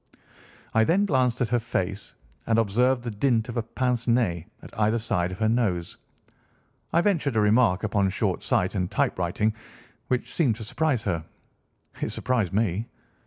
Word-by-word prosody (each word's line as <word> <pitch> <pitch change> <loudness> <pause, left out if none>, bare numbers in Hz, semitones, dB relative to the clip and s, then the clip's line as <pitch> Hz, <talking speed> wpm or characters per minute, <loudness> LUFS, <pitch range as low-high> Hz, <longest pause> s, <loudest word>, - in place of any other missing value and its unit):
I 110 - +4
then 185 - +3
glanced 130 - +1
at 120 - +1
her 120 0 +2
face, 100 -3 -3 0.3
and, 115 -1 +3
observing 120 +4 +2
the 120 - -3
dint 115 +1 +1
of 120 - -5
a - - +2
pince 120 +1 -2
nez 110 -9 +1 0.2
at - - -11
either 110 +2 +3
side 100 -6 -1
of 95 - -6
her 110 - +1
nose, 105 -7 0 1.0
I 170 - +3
ventured 165 - +1
a - - +3
remark 105 -2 +3
upon 100 -2 +1
short 95 - -1
sight 90 - +1
and 90 -3 -1
typewriting, 90 +5 0 0.5
which 125 -1 -2
seemed 135 -10 +2
to 110 - -8
surprise 135 +1 0
her." 85 -5 -1 0.8
"It - - -1
surprised 115 -8 0
me." 105 +1 0
115 Hz, 165 wpm, -26 LUFS, 100-125 Hz, 1.0 s, I